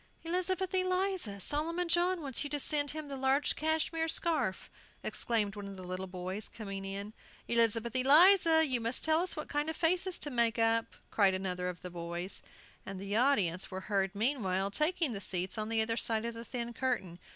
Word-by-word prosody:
"Elizabeth 365 +2 -1
Eliza! 370 - 0
Solomon 330 - -2
John 350 +1 +2
wants 270 -2 -1
you 290 - -4
to 290 +1 -1
send 290 0 +1
him 310 0 -5
the 280 - -5
large 270 +2 +1
cashmere 320 +1 0
scarf!" 320 - +1 0.4
exclaimed 215 -4 -1
one 205 -1 -7
of 195 -1 -9
the 185 - -8
little 185 +1 -5
boys, 185 +3 -3
coming 195 -3 -6
in. 200 +2 -5 0.3
"Elizabeth 230 0 +2
Eliza! 320 +4 +6
you 255 -5 +1
must 230 +2 -2
tell 315 +1 +3
us 365 - 0
what 305 - -5
kind 295 +2 -1
of 320 - -3
faces 360 +3 +1
to 295 - -4
make 235 -2 +1
up!" 225 0 +1 0.2
cried 195 -3 +3
another 180 -1 -2
of 180 - -8
the 180 - -6
boys. 170 +2 -5 0.4
And 195 -1 -7
the 200 +1 -4
audience 210 -9 +2
were 190 0 -5
heard 195 0 -1
meanwhile 200 -5 +1
taking 310 - +1
the 200 -3 -5
seats 185 -1 -1
on 215 -1 -3
the 225 -1 +3
other 230 +1 -1
side 225 -1 +1
of 235 - -3
the 230 +1 -8
thin 240 -1 -4
curtain. 225 -9 -2
235 Hz, 195 wpm, -32 LUFS, 195-315 Hz, 0.4 s, Eliza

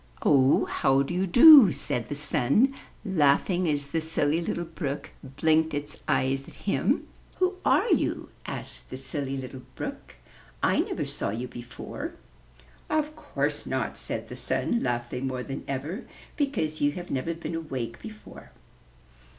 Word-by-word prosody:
''Oh, 135 -1 +4
how 135 +1 +2
do 155 - -4
you 185 +2 0
do?'' 245 - +10
said 130 -4 -3
the 145 - -3
Sun, 145 - +2 0.3
laughing 175 0 +2
as 145 -1 0
the 165 +2 -1
Silly 160 0 +1
Little 170 0 -2
Brook 155 -4 -5
blinked 155 +3 +1
its 145 +1 -4
eyes 135 +1 +1
at - - -14
him. - - +1 0.3
''Who 370 0 +1
are - - +3
you?" - - +1 0.2
asked - - -7
the 130 - -6
Silly 135 +1 -3
Little 130 0 -7
Brook. - - -7 0.5
"I - - +3
never - - -1
saw - - -3
you 115 +5 -3
before." 120 -1 -7 0.7
"Of 305 0 0
course 310 - -2
not," - - -2
said - - -4
the - - -8
Sun, 235 - -1
laughing 120 +1 -2
more 130 -1 -3
than 135 - -6
ever, 145 - -4 0.3
"because 270 - -1
you 145 0 +3
have 175 +2 -7
never 150 +5 -1
been 165 0 -6
awake 130 -8 -4
before. 215 -1 -11
145 Hz, 150 wpm, -27 LUFS, 135-175 Hz, 0.7 s, do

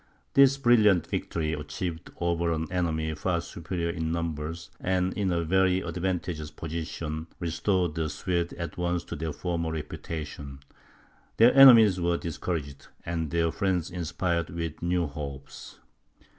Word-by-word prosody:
This 140 0 +6
brilliant 110 - +4
victory, 80 -2 -2
achieved 80 +3 -5
over 85 -1 0
an 80 0 -1
enemy 80 -3 -1
far 85 +3 -1
superior 85 0 -4
in 80 -1 -3
numbers, 85 0 -4
and 90 0 0
in 100 -3 0
a 85 -1 0
very 95 +2 +2
advantageous 85 -3 -3
position, 80 0 -5
restored 85 0 0
the 80 -1 -2
Swedes 85 +1 -2
at 85 +1 -6
once 85 0 0
to - - -7
their 80 +1 -3
former 85 0 -2
reputation; 75 -3 -6 0.8
their 115 +2 +7
enemies 115 -9 +8
were 85 0 +1
discouraged, 80 -4 -4 0.2
and 80 -2 -2
their 85 0 +1
friends 95 -3 -1
inspired 85 -1 -1
with 85 -1 -5
new 85 0 +1
hopes. 70 -2 -8
85 Hz, 135 wpm, -27 LUFS, 80-90 Hz, 0.8 s, enemies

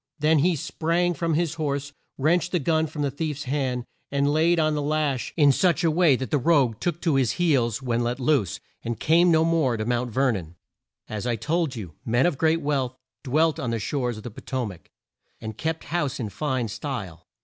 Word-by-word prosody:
Then 155 0 +3
he 175 +4 +3
sprang 170 +4 0
from 165 0 -1
his 165 -1 0
horse, 140 -1 -2 0.2
wrenched 170 +5 +2
the - - +4
gun 160 +1 +1
from 150 -1 -4
the 140 - 0
thief's 150 0 -3
hand, 130 -3 -2 0.2
and 140 +1 +1
laid 165 +2 +3
on 155 -1 +2
the 150 - -1
lash 145 -3 -1
in 145 -3 +6
such 175 +4 +2
a 165 - +3
way 160 -3 +4
that 130 +1 -5
the 145 - +2
rogue 130 -6 +2
took 170 -2 -2
to 165 -4 +1
his 130 -4 +2
heels 135 - +1
when 120 -2 0
let 120 +2 -1
loose, 125 - +1 0.2
and 115 -1 -4
came 170 +3 +4
no 160 -1 +4
more 160 -8 +2
near 110 - -3
Mount 120 +1 0
Ver 130 +3 +2
non. 90 -6 -5 0.5
As 110 +2 -4
I 120 - +1
have 115 - -4
told 160 -4 0
you, 95 -8 -7
men 120 0 +2
of 165 -6 0
great 165 +1 +2
wealth 135 -4 -1 0.3
dwelt 155 +4 +2
on 125 - -2
the 115 - -1
shores 120 +1 -2
of 110 - -9
the 120 - -6
Po - - -11
to 130 -2 -2
mac, 95 -5 -10 0.5
and 110 -1 -6
kept 160 +7 -3
house 150 -5 -1
in 110 -4 -3
fine 130 0 -2
style. 100 - -6
140 Hz, 220 wpm, -25 LUFS, 120-160 Hz, 0.5 s, in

